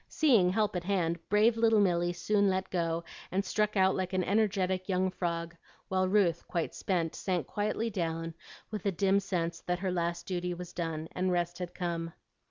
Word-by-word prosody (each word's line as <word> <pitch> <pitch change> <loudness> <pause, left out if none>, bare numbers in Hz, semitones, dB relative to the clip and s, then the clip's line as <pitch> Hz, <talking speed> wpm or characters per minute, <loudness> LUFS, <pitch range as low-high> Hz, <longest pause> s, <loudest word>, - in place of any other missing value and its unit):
Seeing 235 -13 +4
help 205 +1 +1
at 180 - -2
hand, 175 -4 0
brave 215 +3 +4
little 225 -1 +4
Milly 175 -3 +2
soon 200 +3 +2
let 190 0 -1
go, 170 -2 0 0.3
and 195 +3 0
struck 210 -1 0
out 190 0 +4
like 185 0 -2
an 185 -1 +2
energetic 190 -2 +1
young 185 0 +1
frog, 170 -2 -3 0.3
while 185 -1 +2
Ruth, 185 -4 +2
quite 170 -2 -2
spent, 170 -4 -1
sank 180 -4 -1
quietly 215 +2 -1
down, 165 -3 -2 0.4
with 210 -2 -3
a - - +3
dim 195 +2 +3
sense 170 -4 -2
that 180 0 +1
her 185 0 -2
last 170 -1 -1
duty 180 -1 -2
was 180 0 -8
done 160 -2 -3
and 185 0 0
rest 175 0 -1
had 180 -1 -5
come. 170 -2 -3
185 Hz, 185 wpm, -31 LUFS, 170-200 Hz, 0.4 s, Seeing